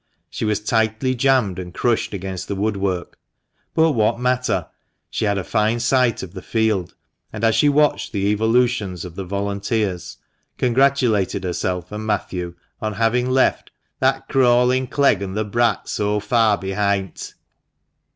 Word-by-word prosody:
She - - -3
was 105 -1 +1
tightly 110 +4 0
jammed 125 -7 +2
and 90 -1 -8
crushed 120 -2 0
against 95 -2 -5
the 100 - -3
woodwork; 100 -3 -2 0.6
but 160 0 +4
what 115 -2 +1
matter? 125 0 0 0.5
she - - -1
had 100 -1 +1
a 95 - -2
fine 110 +3 +1
sight 125 -1 +2
of 90 -1 -9
the 95 - -7
field, 110 -6 -1 0.4
and 110 0 -7
as 115 0 +4
she 145 - +4
watched 150 +1 +2
the 100 -4 -1
evolutions 110 -4 +1
of 90 - -8
the 95 - -5
volunteers, 100 0 -2 0.4
congratulated 125 -7 +2
herself 90 +1 -3
and 105 +1 -5
Matthew 90 -4 -2 0.3
on 110 0 -2
having 115 +4 +1
left 130 0 +2 0.3
"that 135 0 +1
crawling 125 -1 +3
Clegg 140 -4 +2
an' 95 -1 -4
the 110 0 -1
brat 120 +3 0
so 105 0 0
far 110 0 +2
behint." 95 0 -2
110 Hz, 150 wpm, -21 LUFS, 100-125 Hz, 0.6 s, but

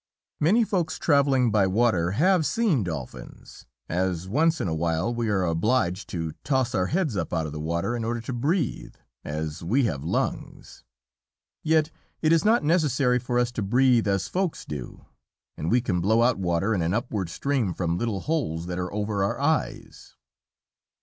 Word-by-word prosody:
Many 205 +10 +4
Folks 175 -7 -1
travelling 140 -5 +3
by 100 -2 +3
water 95 -4 +1
have 180 - +3
seen 195 - +1
Dolphins, 80 -8 -8 0.2
as 90 0 -1
once 160 +9 +2
in - - -1
awhile 80 +6 -1
we 120 -2 -1
are 95 -3 +1
obliged 90 +2 0
to 80 -3 -3
toss 130 -4 0
our 90 0 +1
heads 160 - 0
up 85 -4 -2
out 80 -2 -1
of 75 - -5
the 75 - -6
water 85 +9 -2
in 120 - -3
order 120 +1 -2
to 115 - -5
breathe, 145 +5 -1 0.3
as 75 +2 -5
we 120 +11 +2
have 70 -10 -2
lungs. - - -4 0.8
Yet 160 0 +2 0.3
it 155 0 +3
is 165 - +3
not 220 -1 +3
necessary 145 -6 +2
for 120 0 -2
us 120 0 +1
to 120 - -4
breathe 120 +2 +3
as 100 -2 0
Folks 185 -3 -2
do, 70 -5 -8 0.5
and 80 - -3
we 125 +1 +3
can 90 -7 -1
blow 110 +5 +3
out 120 -3 +2
water 90 +4 0
in 95 - 0
an 85 +4 0
upward 105 -6 -2
stream 130 -1 -1
from 85 0 -2
little 110 -5 -2
holes 120 - -2
that 90 0 -4
are 90 0 -3
over 105 -1 -1
our 100 - -1
eyes. 150 +3 -2
115 Hz, 175 wpm, -25 LUFS, 90-140 Hz, 0.8 s, Many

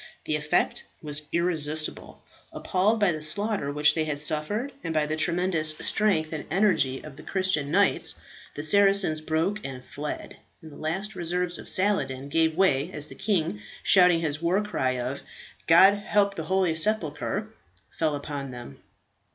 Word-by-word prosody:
The 155 - 0
effect 150 0 0 0.2
was 150 0 0
irresistible. 155 -3 -1 0.3
Appalled 205 +5 0
by 205 -4 +3
the 155 -1 -5
slaughter 200 -1 -2
which 150 +1 +3
they 160 -1 -1
had 150 -2 -3
suffered, 155 - 0
and 160 - -4
by 155 -1 +2
the 155 +1 -2
tremendous 165 -2 0
strength 165 -8 0
and 155 - -4
energy 160 -8 +1
of 145 -3 -11
the - - -10
Christian 185 -7 -1
knights, 195 +5 +2 0.4
the 145 - -5
Saracens 195 -3 +4
broke 160 +7 -1
and 130 -2 -7
fled; 150 +3 -7 0.3
and 160 - -11
the - - -13
last 190 +7 -3
reserves 175 0 -2
of - - -6
Saladin 165 -9 0
gave 160 +1 +1
way 165 -5 +2
as 150 -2 -1
the - - -8
king, 165 - -1 0.2
shouting 180 -3 +5
his 150 -1 -2
war 180 +5 +1
cry 130 -11 -1
of 125 +3 -4 0.5
"God 190 +4 +7
help 205 -1 +1
the 160 -5 -6
holy 185 -1 +1
sepulchre!" 205 +3 0 0.4
fell 155 -2 -1
upon 145 -1 -5
them. 120 - -10
160 Hz, 160 wpm, -26 LUFS, 150-190 Hz, 0.5 s, God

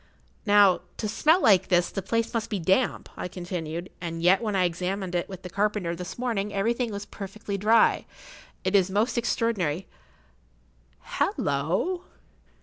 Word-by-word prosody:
"Now, 205 -2 +6 0.2
to 215 - -2
smell 305 - +3
like 190 -3 +5
this, 175 -2 +2
the 195 - -3
place 230 +4 -1
must 230 -2 -2
be 210 - -1
damp," 190 +8 +1
I - - -4
continued, 175 -1 -5
"and 165 -1 -4
yet 185 +5 +5
when 215 -3 -1
I 185 - +3
examined 180 +2 -2
it 175 +2 -1
with 190 -1 -9
the 180 - -6
carpenter 200 -4 0
this 180 +1 -7
morning 225 -5 -1
everything 230 +4 0
was 200 0 -5
perfectly 200 +1 -6
dry. 215 +4 +3 0.6
It 190 +2 0
is 190 -2 +4
most 215 +5 +1
extraordinary—hallo!" 155 - -3
195 Hz, 145 wpm, -26 LUFS, 175-215 Hz, 0.6 s, Now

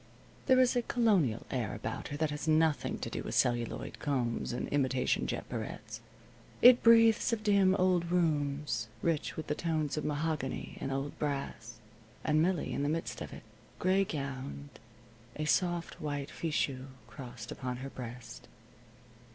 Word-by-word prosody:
There 260 -2 +6
is 255 0 +4
a 245 - +3
Colonial 200 - +2
air 120 -7 -2
about - - -5
her 145 - -5
that 155 0 0
has 150 +1 -4
nothing 155 -1 +2
to - - -3
do - - -3
with - - -4
celluloid 120 -1 0
combs 125 -6 -1
and 120 - -3
imitation 130 -2 +1
jet - - -3
barrettes. - - -6 0.6
It 245 0 +8
breathes 230 0 +6
of 225 -2 -1
dim 200 -3 +4
old 180 -3 +2
rooms, 145 -7 0 0.2
rich 165 -3 0
with 160 - -4
the - - -1
tones 155 -2 -1
of 150 - -1
mahogany 150 -2 -2
and 135 - -2
old 135 +1 -3
brass, 140 -5 -3 0.5
and 155 0 +3
Millie 175 -1 0
in - - -1
the 145 - +1
midst 165 +2 -3
of - - -6
it, - - -10 0.3
gray 190 +2 +3
gowned, 140 -3 -5 0.7
a 155 - -2
soft 175 +1 0
white 145 -2 -3
fichu 140 -5 -2 0.2
crossed 125 -4 -9
upon 125 -2 -4
her 135 +2 -6
breast. 125 -1 -8
150 Hz, 160 wpm, -32 LUFS, 135-175 Hz, 0.7 s, It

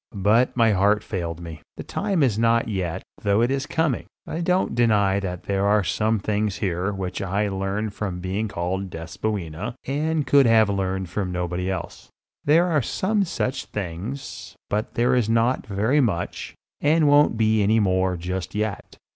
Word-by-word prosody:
But 115 +5 +3
my 115 -2 +5
heart 105 +2 +3
failed 85 -4 -4
me. 85 -2 -8 0.2
The - - -5
time 195 -7 0
is 115 -5 +1
not 115 0 +3
yet, 95 -6 -3 0.2
though 100 +2 +2
it 120 +2 +2
is 135 +1 -1
coming. 160 -6 0 0.2
I 165 - -4
don't 180 +2 +1
deny 105 -5 +3
that 90 -2 -5
there 100 0 -1
are 105 0 +3
some 110 +4 +1
things 105 0 -1
here 95 0 -1
which 95 -2 -4
I 100 +2 0
learned 100 +2 -2
from 100 -4 -3
the 90 - -7
being 95 +4 -2
called 95 0 -3
Despoina 90 +3 -4
and 150 +2 0
could 140 -3 +5
have 110 -2 +5
learned 95 -1 -2
from 95 -1 -2
nobody 90 +1 -2
else. 95 - -5 0.3
There 160 +4 +4
are 160 -5 +2
some 200 - 0
such 135 -6 -2
things, 105 +8 -6 0.2
but 105 +1 -2
there 120 +2 +2
is 120 -3 +2
not 115 +3 +1
very 110 +8 +2
much, 95 -9 -2 0.3
and 155 +1 +3
won't 145 -5 +5
be 110 -1 +3
any 110 +3 +3
more 95 -2 +1
just 90 +3 -4
yet. 105 -2 -3
105 Hz, 175 wpm, -24 LUFS, 95-120 Hz, 0.3 s, my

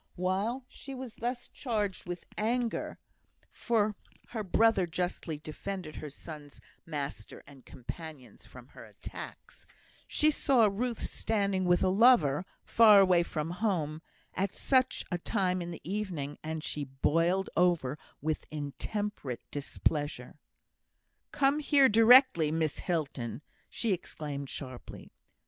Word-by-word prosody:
While 195 +8 -1
she 275 -1 -10
was 255 -3 -7
thus 245 +1 -3
charged 210 -8 -3
with 175 -1 -5
anger 230 +2 -1 0.5
(for 215 -3 +1 0.4
her 220 -3 -3
brother 215 -1 +3
justly 175 -2 -3
defended 155 +2 -6
her 150 - -6
son's 145 0 -11 0.3
master 140 - -5
and 140 -3 -16
companions 135 -2 -9
from 125 0 -14
her - - -12
attacks), - - -10 0.4
she 305 0 +3
saw 270 -6 +3
Ruth 225 +3 -1
standing 200 -4 0
with 175 0 +3
a 185 - +3
lover, 185 - +5 0.2
far 215 -3 +7
away 185 -3 +5
from 160 -1 -3
home, 175 -6 -1 0.3
at 195 0 -2
such 260 -2 +2
a 175 - -1
time 185 +1 0
in 170 - -5
the 170 - -8
evening, 180 -8 -3
and 160 0 -4
she 145 -1 -3
boiled 165 +8 +1
over 165 -6 +2 0.2
with 155 0 -2
intemperate 150 - -4
displeasure. 145 -1 -2 0.9
"Come 280 +1 +2
here 285 -2 +5
directly, 225 - +6
Miss 160 -2 -1
Hilton," 140 -7 -3 0.3
she 225 -4 0
exclaimed, 145 -5 -5
sharply. 130 -3 -8
180 Hz, 125 wpm, -30 LUFS, 150-220 Hz, 0.9 s, far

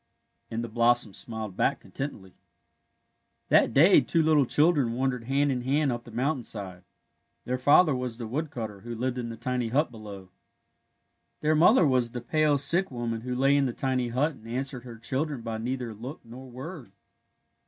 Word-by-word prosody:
" - - -46
and 115 +1 -3
the - - -4
blossoms 120 -2 +2
smiled 110 -4 -5
back 140 - +1
contentedly. 105 -9 -7 1.2
That - - +5
day 165 - +6
two 165 -1 +1
little 155 -4 +3
children 145 -6 +3
wandered 125 -1 -1
hand 140 +2 +1
in 125 -2 -2
hand 140 +2 +1
up 120 0 -5
the - - -11
mountainside. 110 - -3 0.6
Their 125 +1 -2
father 145 +3 +5
was 125 -2 -4
the 120 - -5
wood 150 +8 -3
cutter 110 -6 -6
who 120 +4 -7
lived 125 +2 -2
in 120 -1 -4
the 115 - -7
tiny 125 -1 -2
hut 135 +5 +1
below. 100 -4 -10 1.1
Their 155 +1 +2
mother 175 +5 +5
was 130 -4 +2
the 125 - -3
pale, 150 +3 +2
sick 170 +7 +2
woman 120 -3 -4
who 125 +1 -4
lay 135 +2 +3
in 140 -1 +2
the 125 - -3
tiny 130 -2 -1
hut 130 +7 0
and 115 -6 -15
answered 130 +1 -4
her 120 -2 -9
children 130 +3 -3
by 115 -1 -4
neither 125 0 -3
look 125 +8 -8
nor 130 +3 -11
word. 130 - -9
125 Hz, 185 wpm, -27 LUFS, 115-140 Hz, 1.2 s, day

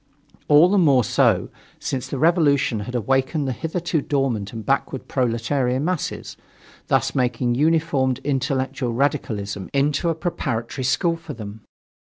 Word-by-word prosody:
All 150 +3 +7
the 200 +2 +3
more 140 -7 +4
so, - - +2 0.3
since 130 -2 -4
the 140 - -4
revolution 145 - +3
had 120 +5 -6
awakened 135 +5 0
the - - 0
hitherto 165 +4 -2
dormant 125 -9 -1
and 110 -2 -7
backward 135 0 -1
proletarian 125 +2 0
masses, 180 -3 -3 0.5
thus - - +1
making 125 -1 0
uninformed 155 -6 +2
intellectual 135 -2 -1
radicalism 105 -8 -2
into 145 +4 +1
a 165 - 0
preparatory 130 -7 -3
school 165 +6 +1
for 165 - -9
them. 105 -1 -8
135 Hz, 135 wpm, -22 LUFS, 120-150 Hz, 0.5 s, All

